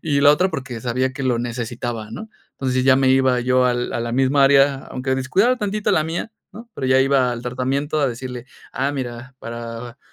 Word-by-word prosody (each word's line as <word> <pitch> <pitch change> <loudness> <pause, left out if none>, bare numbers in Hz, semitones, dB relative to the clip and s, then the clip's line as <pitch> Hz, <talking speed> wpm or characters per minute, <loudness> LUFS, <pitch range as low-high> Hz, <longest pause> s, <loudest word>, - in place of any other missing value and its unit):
y 145 -3 +1
la 145 - +8
otra 180 +6 +3
porque 130 -6 -5
sabía 130 +2 -1
que 135 - -6
lo 125 -3 +1
necesitaba, 120 -2 -4
¿no? 220 0 -8 0.2
Entonces, 130 -1 -1
ya 130 -1 +6
me 135 0 +3
iba 130 -1 +3
yo 125 +1 +2
al 120 0 -1
a - - -2
la 115 0 -3
misma 135 +2 +3
área, 140 0 +5
aunque 130 +1 -2
descuidaba 185 - +2
tantito 210 -1 -1
la 155 - +2
mía, 165 +7 -4 0.2
¿no? 230 +2 -12
Pero 130 - -3
ya 130 0 +4
iba 135 -2 +2
al 120 0 -6
tratamiento 135 +5 -1
a 140 - +2
decirle: 125 0 -6 0.3
"Ah, 135 +2 -1
mira, 125 -1 -6
para, 115 +2 -7
130 Hz, 205 wpm, -21 LUFS, 120-140 Hz, 0.3 s, la